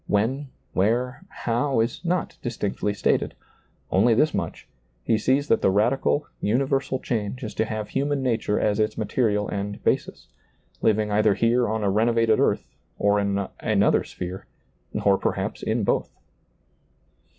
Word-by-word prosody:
When, 125 +8 0 0.3
where, 125 - 0
how, 120 +2 -1
is 115 +9 -1
not 180 0 -1
distinctly 105 -3 -2
stated; - - +1 0.6
only 110 +4 +4
this 150 +6 +3
much, - - -4 0.2
— - - -41
he 115 - +2
sees 135 +6 +2
that - - +3
the - - +4
radical, 125 +8 +2 0.2
uni 125 +6 +2
versal 135 -1 -1
change 115 +2 -2
is 110 - -5
to 110 - 0
have 110 -1 -4
human 140 0 -1
nature 115 -4 0
as 105 0 +1
its 105 0 0
material 105 -1 0
and 100 0 -4
basis; - - -1 0.5
living 105 -1 +2
either 105 -1 +3
here 120 +2 +2
on 110 0 -1
a 100 - +2
ren 110 +4 +2
ovated 115 -2 +3
earth, - - +2 0.3
or 100 0 +3
in 100 -1 0
another 105 -3 +2
sphere, 90 +2 -7 0.6
or 100 -1 +4
perhi^ - - -2
in - - 0
both. - - 0
110 Hz, 155 wpm, -24 LUFS, 105-125 Hz, 0.6 s, only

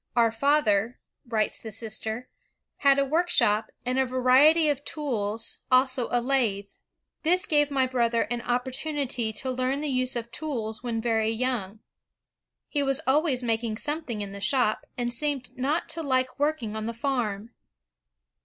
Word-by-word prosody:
"Our 230 -2 +4
father," 230 -3 +2 0.3
writes 220 -2 -1
the 220 - -7
sister, 220 +2 -3 0.5
"had 280 -1 +4
a 280 - +3
workshop... 275 -9 +2 0.2
and 255 +1 0
a 265 - +3
variety 260 +6 +5
of 285 -1 0
tools, 230 -8 -2
also 255 -1 +4
a 245 - +2
lathe. 235 -6 0 0.5
This 355 +3 +2
gave 295 -2 +2
my 270 -2 +2
brother 235 -2 +1
an 240 0 -3
oppor 245 +2 -1
.tunity... 270 -6 -2
to 260 - -2
learn 255 +2 -1
the 300 0 -2
use 255 0 0
of 235 0 -4
tools 235 -7 -4
when 235 -2 -2
very 225 -1 +1
young..., 225 -3 -2 0.9
He 290 - -1
was 275 +1 +1
always 270 -2 +2
making 225 -1 -1
something 290 -6 -2
in 200 -1 -4
the 200 0 -8
shop, 220 +1 +2
and 240 -1 -1
seemed 280 -1 -2
not 285 +6 -1
to 330 - -3
like 260 -3 0
working 285 -8 -1
on 220 0 -3
the 230 - -4
farm. 230 -4 -2
250 Hz, 160 wpm, -26 LUFS, 225-280 Hz, 0.9 s, variety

